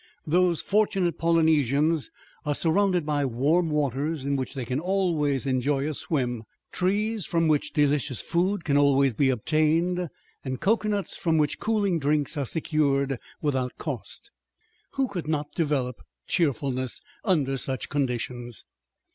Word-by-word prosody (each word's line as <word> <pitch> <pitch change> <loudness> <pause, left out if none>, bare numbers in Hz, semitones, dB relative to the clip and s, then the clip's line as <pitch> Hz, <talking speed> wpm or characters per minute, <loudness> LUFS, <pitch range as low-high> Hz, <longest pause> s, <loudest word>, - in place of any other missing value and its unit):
Those 175 +1 +2
fortunate 195 -4 +1
Polynesians 160 -2 +2 0.3
are 150 -1 0
surrounded 180 +1 +2
by 145 -1 0
warm 145 +7 +1
waters 145 0 -1
in 140 0 0
which 135 +1 -3
they 130 -3 -3
can 130 +3 -1
always 165 -7 0
enjoy 135 +2 0
a 155 - -2
swim, 125 -6 -2 0.3
trees 205 +1 0
from 165 -1 +1
which 150 -2 +1
delicious 145 -4 +1
food 180 +2 0
can 145 -2 +2
always 140 -2 +4
be 135 +4 +2
obtained, 160 +7 +1 0.3
and 130 -2 -4
cocoanuts 210 -1 0
from 165 -3 +1
which 150 -1 +1
cooling 205 -6 +1
drinks 145 0 +1
are 140 -3 -1
secured 140 -4 0 0.2
without 130 -4 -1
cost. - - -6 0.6
Who 270 -1 +1
could 180 -8 -5
not 150 -2 -2
develop 140 - -1 0.2
cheerfulness 135 -6 0 0.2
under 150 -10 +1
such 130 0 -3
conditions? 120 -3 -3
150 Hz, 135 wpm, -26 LUFS, 135-170 Hz, 0.6 s, always